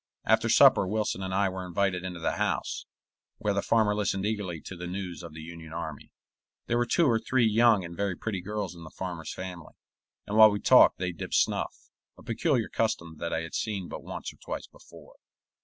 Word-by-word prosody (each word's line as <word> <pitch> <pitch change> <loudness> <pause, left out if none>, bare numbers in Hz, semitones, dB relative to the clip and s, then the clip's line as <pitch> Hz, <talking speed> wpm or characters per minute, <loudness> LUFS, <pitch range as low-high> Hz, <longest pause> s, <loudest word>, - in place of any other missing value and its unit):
After 110 +1 +3
supper 130 -6 +6
Wilson 105 -1 -1
and 95 0 -4
I 100 +1 +2
were 95 0 -4
invited 90 0 -1
into 90 -2 -5
the 80 - -1
house, - - -2 0.5
where 105 - 0
the 100 - 0
farmer 110 -1 +3
listened 100 -2 -1
eagerly 100 -6 -2
to 95 - -8
the 90 0 -6
news 90 -1 -5
of 85 -3 -10
the 80 - -8
Union 80 0 -10
army. 80 -3 -6 0.6
There 120 0 +1
were 120 - +1
two 170 - +3
or 115 -5 +3
three 130 +1 +2
young 110 -3 +4
and 85 0 -8
very 100 0 -1
pretty 100 -2 -4
girls 105 -1 -4
in 85 -1 -12
the 80 - -9
farmer's 85 -3 -6
family, 90 -4 -8 0.5
and 105 - -4
while 110 0 +10
we 105 0 -2
talked - - +6
they 90 0 -2
dipped 85 - -5
snuff, - - +1 0.4
a - - -15
peculiar 120 +1 0
custom 85 -8 -2
that 85 +1 -4
I 80 - 0
had 80 0 -8
seen 100 -5 -3
but - - -6
once - - -6
or - - -23
twice - - -6
before. - - -17
95 Hz, 210 wpm, -28 LUFS, 85-110 Hz, 0.6 s, while